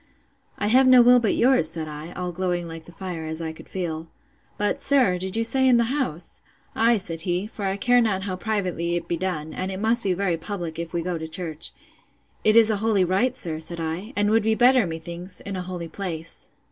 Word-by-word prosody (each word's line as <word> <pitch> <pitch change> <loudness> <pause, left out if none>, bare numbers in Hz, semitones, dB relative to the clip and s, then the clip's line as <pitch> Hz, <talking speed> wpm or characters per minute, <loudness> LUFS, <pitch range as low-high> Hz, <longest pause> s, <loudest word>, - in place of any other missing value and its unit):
I 205 - -2
have 255 +5 +5
no 255 -1 +8
will 245 +1 +7
but 225 -4 +1
yours, 245 -10 +3
said 160 -1 -3
I 150 +2 -8
(all 180 -1 -4
glowing 175 -1 -2
like 165 -1 -9
the - - -13
fire, 175 -2 -6
as 160 0 -4
I 165 -1 -4
could - - -14
feel:) 165 -3 -4 0.5
But, 205 0 -1
sir, 250 -11 +4
did 190 +2 -1
you 230 - +2
say 260 +3 +3
in 250 -2 +5
the 235 +2 +1
house? 170 - -2 0.3
Ay, 230 +1 +4
said 165 -4 -2
he; 180 +2 -1
for 210 -2 -6
I 195 0 -1
care 245 +3 +4
not 200 -5 0
how 190 -2 -3
privately 185 -4 -2
it 170 -1 -3
be 170 - -1
done; 165 -3 -3
and 185 +1 -3
it 190 - -5
must 225 +3 +2
be 190 - +1
very 180 -3 0
public 170 -2 -5
if 170 -1 -5
we 170 -1 -2
go 175 -1 -3
to 160 - -5
church. 160 -1 -3 0.7
It 215 - +4
is 225 -1 +7
a 215 - 0
holy 210 -2 +2
rite, 225 +8 +1
sir, 160 -7 -1
said 170 +1 -1
I; 165 +7 -4
and 205 +1 +2
would 225 +1 +4
be 220 +1 +1
better, 245 -2 +4
methinks, 170 +3 -6
in 200 - -6
a 185 - -3
holy 180 -2 -6
place. 165 -3 -5
185 Hz, 235 wpm, -24 LUFS, 170-220 Hz, 0.7 s, no